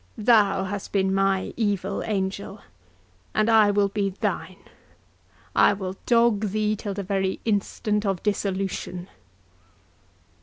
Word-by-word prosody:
Thou 205 -4 +4
hast 195 +1 -5
been 190 -1 +2
my 195 -1 +1
evil 200 -3 -1
angel, 200 0 -3 0.7
and 215 - +2
I 220 -2 +6
will 205 0 +3
be 200 0 -1
thine—I 195 +1 -3
will 190 -2 -5
dog 230 -3 +3
thee 215 +1 0
till 205 -1 -5
the 200 - -3
very 190 0 -1
instant 210 0 0
of 195 -4 -2
dissolution!" 195 -3 -2
200 Hz, 115 wpm, -25 LUFS, 195-210 Hz, 0.7 s, I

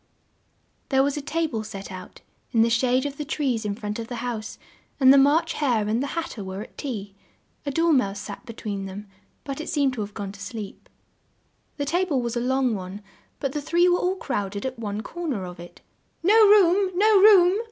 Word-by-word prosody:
There 270 -1 +4
was 280 0 0
a 295 - -3
ta 325 +4 -1
ble 225 -8 -3
set 200 -3 -8
out, 185 -1 -10 0.3
in 225 -1 +5
the 230 - +1
shade 255 +2 +2
of 285 -1 -4
the 300 - -3
trees 270 -7 -1
in 205 -1 -2
front 210 0 -5
of 225 - -5
the 245 - -5
house, 235 -3 -5 0.4
and 265 -1 +7
the - - +6
March 285 +4 +3
Hare 240 -8 0
and 225 +3 0
the 280 +4 -4
Hat 335 0 -2
ter 210 - -7
were 190 +2 -5
at - - -16
tea; 210 -8 -5 0.5
a - - 0
Dor 330 +3 +2
mouse 200 -7 +1
sat 200 +2 -8
be 235 -2 -9
tween 200 -3 -5
them, 200 +2 -8 0.4
but 275 +1 -5
it - - -6
seemed 280 -3 +1
to 235 - -4
have 205 0 -6
gone 200 -2 -5
to 200 - -14
sleep. 200 +1 -8 0.9
The 285 - -2
ta 345 +6 +1
ble 290 -7 0
was 240 -1 -3
a - - 0
long 255 0 +1
one, 195 +1 -6 0.4
but 275 -2 -2
the 295 - -3
three 340 +4 +3
were 355 0 +3
all 365 +1 0
crowd 205 - -3
ed 200 - -5
at 260 -2 -4
one 210 -1 -3
cor 345 +5 -6
ner 215 -11 -2
of 180 -1 -9
it. 175 0 -12 0.4
"No 390 +5 +4
room! 395 -1 +5
No 420 +1 +5
room!" 385 -1 +6
250 Hz, 230 wpm, -24 LUFS, 210-300 Hz, 0.9 s, and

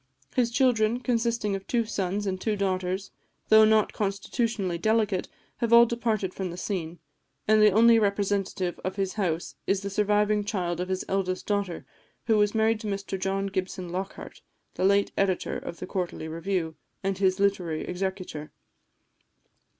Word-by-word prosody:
His 245 -3 +2
children, 240 -2 +2
consisting 230 -4 0
of 195 0 -7
two 235 -2 +1
sons 200 -1 -2
and 185 -1 -2
two 215 -2 0
daughters, 190 -1 -2 0.4
though 220 0 +8
not 215 -1 +3
constitutionally 200 -2 -1
delicate, 215 -2 +1 0.3
have 235 -1 -1
all 235 0 +9
departed 225 -5 -1
from 190 -2 -4
the 175 - -7
scene, 175 -4 -4 0.5
and 215 0 +5
the 215 - +8
only 225 +3 +6
representative 200 -3 -1
of 185 - -3
his 195 -1 -1
house 175 -5 -2
is 195 -1 +1
the 200 0 -4
surviving 210 +1 +2
child 180 -5 -2
of 180 +1 -3
his 185 0 -2
eldest 185 -1 -1
daughter, 200 -4 -2 0.4
who 225 - +3
was 210 +1 +2
married 220 0 +2
to 220 - -6
Mr 195 -1 -3
John 195 +1 -1
Gibson 185 -2 -3
Lockhart, 190 +2 -6 0.3
the 185 - -1
late 200 +1 +3
editor 190 -2 0
of 170 - -6
the - - -6
Quarterly 180 -4 -4
Review, 165 0 -2 0.3
and 195 0 -1
his 190 -1 +2
literary 185 -5 0
executor. 180 -4 -4
195 Hz, 160 wpm, -27 LUFS, 185-215 Hz, 0.5 s, all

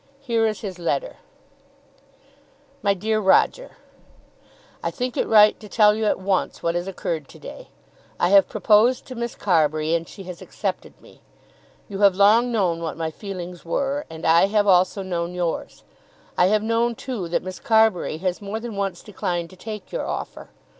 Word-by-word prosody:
Here 230 -4 +1
is 215 -1 -3
his 190 -4 -6
letter: - - -2 1.6
MY 200 -1 +2
DEAR 215 +3 0
ROGER, - - +2 1.0
I - - -1
think 250 -1 -4
it - - 0
right 210 -1 +6
to 210 - -12
tell 210 -1 +5
you 220 +1 -2
at - - +2
once 190 0 -1
what 170 - +1
has 175 +2 -3
occurred 165 -5 -4
to - - -14
day. - - -10 0.5
I 175 - +2
have 200 0 +5
proposed 225 +4 +3
to 255 - -8
Miss 235 -1 -4
Carbury 155 -4 +1
and 165 -1 -1
she 195 - -10
has 180 -2 -9
accepted - - -5
me. - - -19 0.7
You 195 -2 -6
have 200 -2 +5
long 220 +5 +4
known 180 -7 0
what 165 -2 -4
my 160 -1 -3
feelings 180 -2 -8
were, 275 - -2
and 160 0 -8
I 165 +4 +5
have 205 0 +2
also 190 +1 +3
known 175 -1 -3
yours. 175 -2 -3 0.5
I 180 - +4
have 215 +2 +2
known, 230 +1 +1
too, 230 -8 -5
that 170 - -1
Miss 185 -1 -7
Carbury 220 -8 +2
has 185 +2 -2
more 205 +2 -4
than 230 -2 -7
once 195 -3 -3
declined 175 -4 -4
to - - -14
take 210 +2 -8
your - - -3
offer. - - -6
195 Hz, 180 wpm, -23 LUFS, 175-220 Hz, 1.6 s, right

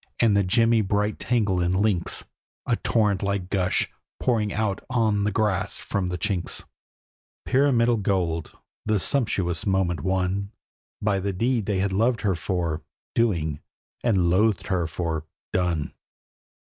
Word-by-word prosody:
and 110 -4 +4
the 100 - +4
gemmy 115 +4 +4
bright 105 +1 0
tangle 105 -7 +1
in 90 +1 +1
links, 95 -2 +1 0.4
A - - +2
torrent 105 -4 +1
like 100 -2 -2
gush, 90 -2 +1 0.3
pouring 110 -4 +1
out 105 -2 -1
on 110 -5 +2
the 105 - +1
grass 100 -2 0
from 100 -2 -2
the 90 0 -2
chinks, 95 -2 -1 0.8
Pyramidal 120 -4 +3
gold! 90 -5 -1 0.3
the 110 0 +1
sumptuous 95 - 0
monument 95 -4 +1
won 95 +1 0 0.5
By 100 -2 +2
the 100 +1 -2
deed 115 +2 0
they 100 -2 +1
had 95 0 0
loved 115 +4 +2
her 100 -3 +2
for, 85 -2 -2 0.3
doing, 85 -10 +1 0.4
and 95 -7 +3
loathed 105 0 +2
her 90 -4 +1
for, 80 -1 -3 0.3
done. 85 -5 0
100 Hz, 140 wpm, -25 LUFS, 90-110 Hz, 0.8 s, and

